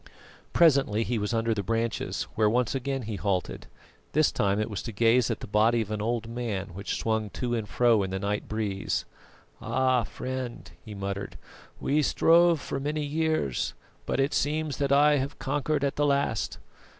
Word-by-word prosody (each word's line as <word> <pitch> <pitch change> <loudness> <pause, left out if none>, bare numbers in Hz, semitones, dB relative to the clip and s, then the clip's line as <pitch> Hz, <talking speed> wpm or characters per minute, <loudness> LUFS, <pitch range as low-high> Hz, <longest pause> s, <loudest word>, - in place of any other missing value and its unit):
Presently 135 -10 +4
he 115 0 -1
was 105 0 -2
under 115 0 +1
the 105 - -2
branches, 115 +3 -1
where 110 -1 +3
once 120 +2 +1
again 135 0 -2
he 105 -2 -4
halted; 95 -3 -2 0.5
this 155 +1 +4
time 100 +1 +1
it 110 - 0
was 105 -4 -4
to 115 - -6
gaze 115 +3 +3
at - - -3
the - - -5
body 110 +3 +3
of 110 -1 -5
an 105 -1 -2
old 115 +1 -1
man 115 -5 -3
which 100 +4 -4
swung 110 -1 -1
to 120 +3 -3
and 110 -3 -2
fro 115 0 +3
in 95 - -2
the 95 - -2
night 100 +1 -2
breeze. 105 -3 -2 0.6
"Ah! 130 +2 +2
friend," 130 +2 -6
he 105 -2 -9
muttered, 100 0 -4 0.4
"we 150 +2 +1
strove 170 +2 +4
for 135 - -4
many 150 +2 -2
years, 155 - -1 0.3
but - - -1
it 135 +2 +1
seems 150 0 0
that 140 -1 0
I 145 +1 +5
have 140 +2 -3
conquered 145 0 -1
at 140 - -1
the 145 - +2
last. 140 0 0
115 Hz, 185 wpm, -27 LUFS, 105-140 Hz, 0.6 s, I